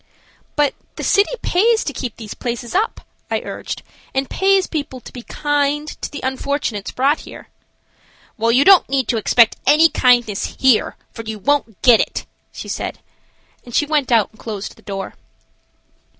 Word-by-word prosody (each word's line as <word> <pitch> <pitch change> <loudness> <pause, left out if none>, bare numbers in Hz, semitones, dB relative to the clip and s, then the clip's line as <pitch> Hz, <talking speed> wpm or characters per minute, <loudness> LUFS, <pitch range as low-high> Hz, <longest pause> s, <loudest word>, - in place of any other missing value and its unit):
"But 295 -2 +2 0.2
the - - -6
city 400 +1 +3
pays 440 +5 +3
to 285 - -4
keep 245 -2 -5
these 215 -3 -8
places 240 -1 -5
up," 420 +5 0 0.3
I - - 0
urged, - - -6 0.3
"and 270 0 0
pays 385 +3 +2
people 285 -5 -4
to - - -13
be 245 - -7
kind 290 +2 -1
to - - -3
the 290 - -7
unfortunates 260 -5 -2
brought 275 +4 +1
here." - - -12 0.9
"Well, 230 +1 +1
you 260 +4 +4
don't 390 -2 +7
need 265 -3 0
to 235 - +1
expect 225 +1 +4
any 320 +2 +6
kindness 240 -7 +2
here, 260 -4 +3 0.2
for - - -7
you 220 -1 -6
won't 230 -1 0
get 240 -3 +7
it," - - -2 0.3
she - - -8
said, - - -4 0.7
and 240 - -9
she 295 - +3
went 295 -3 0
out 225 -4 +3
and 220 - -23
closed 210 -3 -6
the - - -20
door. 195 -1 -6
260 Hz, 170 wpm, -19 LUFS, 230-295 Hz, 0.9 s, don't